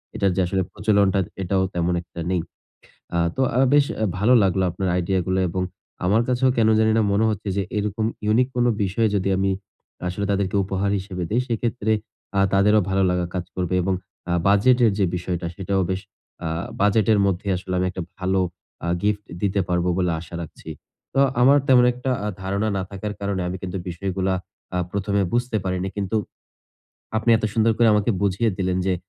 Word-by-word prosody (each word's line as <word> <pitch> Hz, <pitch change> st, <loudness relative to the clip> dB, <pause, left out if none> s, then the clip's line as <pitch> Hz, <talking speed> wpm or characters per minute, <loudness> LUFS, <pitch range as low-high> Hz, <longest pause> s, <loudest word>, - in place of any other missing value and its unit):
এটার 100 Hz, -1 st, +2 dB
যে 95 Hz, -, +2 dB
আসলে 95 Hz, +1 st, 0 dB
প্রচলনটা, 100 Hz, -2 st, +2 dB, 0.2 s
এটাও 95 Hz, +1 st, +1 dB
তেমন 90 Hz, 0 st, 0 dB
একটা 85 Hz, -, -12 dB
নেই। 90 Hz, -2 st, +1 dB, 0.8 s
আ -, -, +2 dB, 0.2 s
তো -, -, -1 dB, 0.2 s
আ -, -, +3 dB
বেশ 145 Hz, -1 st, +6 dB
অ্যা 110 Hz, -, 0 dB
ভালো 110 Hz, +6 st, +4 dB
লাগলো 95 Hz, -1 st, +2 dB
আপনার 95 Hz, +2 st, -2 dB
আইডিয়াগুলা 95 Hz, +1 st, 0 dB
এবং 90 Hz, +2 st, -2 dB, 0.4 s
আমার 105 Hz, +6 st, +3 dB
কাছেও 130 Hz, +1 st, +3 dB
কেন 110 Hz, -1 st, +4 dB
জানিনা 110 Hz, 0 st, +3 dB
মনে 105 Hz, +2 st, +2 dB
হচ্ছে 105 Hz, -1 st, -4 dB
যে, 100 Hz, -, +1 dB, 0.2 s
এরকম 105 Hz, +1 st, -1 dB, 0.2 s
ইউনিক 120 Hz, +4 st, +3 dB
কোন 120 Hz, -, +3 dB, 0.2 s
বিষয়ে 105 Hz, +4 st, +1 dB
যদি 100 Hz, 0 st, 0 dB
আমি 95 Hz, 0 st, +1 dB, 0.6 s
আসলে 100 Hz, +3 st, -3 dB
তাদেরকে 100 Hz, 0 st, 0 dB
উপহার 95 Hz, +1 st, -1 dB
হিসেবে 95 Hz, -2 st, -5 dB
দেই, 120 Hz, -, +2 dB
সেক্ষেত্রে 115 Hz, -1 st, -1 dB, 0.4 s
আ -, -, +3 dB
তাদেরও 105 Hz, +2 st, +5 dB
ভালো 95 Hz, 0 st, +2 dB
লাগা 90 Hz, -1 st, 0 dB
কাজ 90 Hz, -1 st, -2 dB
করবে 90 Hz, 0 st, -1 dB
এবং 95 Hz, +1 st, +1 dB, 0.4 s
আ -, -, +1 dB
বাজেটের 115 Hz, +4 st, +5 dB
যে 100 Hz, -, +3 dB
বিষয়টা, 90 Hz, -1 st, -3 dB
সেটাও 95 Hz, 0 st, 0 dB
বেশ 95 Hz, 0 st, -1 dB, 0.5 s
আ -, -, 0 dB, 0.3 s
বাজেটের 105 Hz, +1 st, +3 dB
মধ্যে 100 Hz, +1 st, -1 dB
আসলে 95 Hz, 0 st, -5 dB
আমি 90 Hz, -, +1 dB
একটা 90 Hz, 0 st, -5 dB, 0.2 s
ভালো 95 Hz, +1 st, +1 dB, 0.5 s
আ -, -, -1 dB
গিফট 105 Hz, 0 st, 0 dB, 0.2 s
দিতে 100 Hz, -1 st, +1 dB
পারবো 90 Hz, 0 st, +1 dB
বলে 90 Hz, -1 st, +1 dB
আশা 85 Hz, +1 st, -11 dB
রাখছি। 80 Hz, 0 st, -10 dB, 0.4 s
তো 135 Hz, -, +3 dB, 0.2 s
আমার 140 Hz, +3 st, +7 dB
তেমন 125 Hz, -2 st, +7 dB
একটা 125 Hz, +2 st, -4 dB
আ -, -, -2 dB, 0.2 s
ধারণা 100 Hz, +3 st, -1 dB
না 95 Hz, -, -1 dB
থাকার 105 Hz, +1 st, -4 dB
কারণে 100 Hz, -1 st, -1 dB
আমি 90 Hz, -, -3 dB
কিন্তু 95 Hz, 0 st, -4 dB
বিষয়গুলা 95 Hz, +1 st, -1 dB, 0.4 s
আ -, -, +1 dB
১ম 100 Hz, 0 st, -2 dB
এ -, -, +1 dB
বুঝতে 120 Hz, -2 st, 0 dB
পারিনি। 95 Hz, 0 st, -1 dB
কিন্তু 100 Hz, +2 st, -1 dB, 1.0 s
আপনি 115 Hz, -, 0 dB
এত 110 Hz, -, -9 dB
সুন্দর 115 Hz, 0 st, +3 dB
করে 120 Hz, -1 st, +5 dB
আমাকে 105 Hz, +2 st, +2 dB
বুঝিয়ে 100 Hz, +3 st, +2 dB
দিলেন 95 Hz, -1 st, 0 dB
যে 95 Hz, -, +2 dB
100 Hz, 185 wpm, -23 LUFS, 95-110 Hz, 1.0 s, আমার